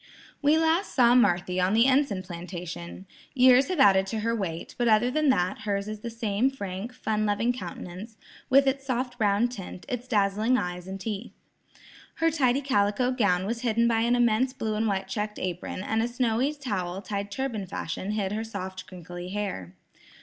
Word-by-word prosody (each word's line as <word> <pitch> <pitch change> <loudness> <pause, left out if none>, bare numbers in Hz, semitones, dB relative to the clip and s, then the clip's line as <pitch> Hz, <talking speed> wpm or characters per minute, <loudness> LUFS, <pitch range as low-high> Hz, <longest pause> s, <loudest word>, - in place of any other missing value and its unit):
We 295 +2 +4
last 325 +4 +1
saw 240 -2 +6
Marthy 180 -6 +3
on 185 +3 +2
the 230 +2 +5
Enson 260 -8 +2
plantation. 175 0 -7 0.3
Years 255 +1 +6
have 365 -4 -2
added 195 -5 +5
to 220 +2 -3
her 230 +1 0
weight, 170 -6 -4
but 240 - +2
other 225 +3 +4
than 305 +1 +2
that, 185 -5 +1
hers 200 -1 -2
is 215 0 -5
the 235 - -5
same 225 +1 0
frank, 200 -3 -6
fun 215 -4 -1
loving 220 +4 +1
countenance, 185 0 -8 0.3
with 275 +1 +6
its 270 0 0
soft 250 -1 -3
brown 210 +2 +3
tint, 195 -6 -8
its 250 -2 -4
dazzling 215 +2 +2
eyes 180 -3 -4
and 190 +1 -6
teeth. 210 +2 -5 0.8
Her 330 0 +2
tidy 270 -3 +2
calico 245 -1 +1
gown 200 -8 +1
was 230 +3 -3
hidden 235 -1 +2
by 230 -1 +2
an 235 +2 +2
immense 240 +2 +2
blue 220 -4 -3
and 220 +1 0
white 195 -2 -1
checked 210 +1 -3
apron, 185 +1 -4
and 220 +2 0
a 230 - +1
snowy 245 +2 0
towel 195 -9 -4
tied 200 -1 -4
turban 220 -3 -3
fashion 190 +1 -4
hid 200 -3 -1
her 215 +2 -2
soft 190 -4 -6
crinkly 175 0 -8
hair. 185 - -4
215 Hz, 185 wpm, -27 LUFS, 190-250 Hz, 0.8 s, saw